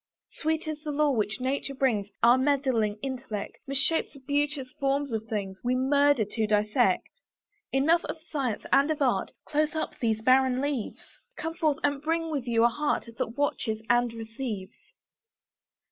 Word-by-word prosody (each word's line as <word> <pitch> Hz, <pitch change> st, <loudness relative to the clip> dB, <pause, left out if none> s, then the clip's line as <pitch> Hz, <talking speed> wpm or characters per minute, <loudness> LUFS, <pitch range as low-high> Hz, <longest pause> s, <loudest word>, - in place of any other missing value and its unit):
Sweet 315 Hz, +1 st, -2 dB
is 305 Hz, -1 st, -4 dB
the 305 Hz, -, -4 dB
lore 290 Hz, -1 st, +2 dB
which 210 Hz, 0 st, -1 dB
nature 275 Hz, +2 st, -2 dB
brings; 225 Hz, -7 st, +1 dB
Our 240 Hz, +1 st, +8 dB
meddling 260 Hz, -6 st, +1 dB
intellect 255 Hz, -6 st, -5 dB
Misshapes 280 Hz, +4 st, 0 dB
the 280 Hz, -, -13 dB
beauteous 285 Hz, -1 st, -1 dB
forms 275 Hz, -1 st, 0 dB
of 220 Hz, 0 st, -3 dB
things; 195 Hz, -3 st, -3 dB
We 250 Hz, +1 st, +1 dB
murder 280 Hz, -2 st, +3 dB
to 220 Hz, +1 st, -2 dB
dissect. 210 Hz, 0 st, +2 dB, 0.6 s
Enough 320 Hz, +6 st, +3 dB
of 330 Hz, -, -5 dB
science 280 Hz, -9 st, -3 dB
and 280 Hz, +2 st, +5 dB
of 310 Hz, -1 st, 0 dB
art; 250 Hz, -3 st, +1 dB, 0.2 s
Close 305 Hz, +1 st, 0 dB
up 315 Hz, -, -3 dB
these 220 Hz, -2 st, 0 dB
barren 255 Hz, 0 st, +4 dB
leaves; 280 Hz, -5 st, -3 dB, 0.3 s
Come 325 Hz, +1 st, -3 dB
forth, 310 Hz, -3 st, +1 dB
and 285 Hz, -1 st, +1 dB
bring 325 Hz, +1 st, -1 dB
with 275 Hz, -5 st, -3 dB
you 230 Hz, -1 st, +3 dB
a -, -, +7 dB
heart 290 Hz, 0 st, -1 dB
That 230 Hz, +4 st, -3 dB
watches 230 Hz, -6 st, 0 dB
and 240 Hz, 0 st, +3 dB
receives. 225 Hz, -3 st, -6 dB
265 Hz, 160 wpm, -28 LUFS, 225-290 Hz, 0.6 s, Our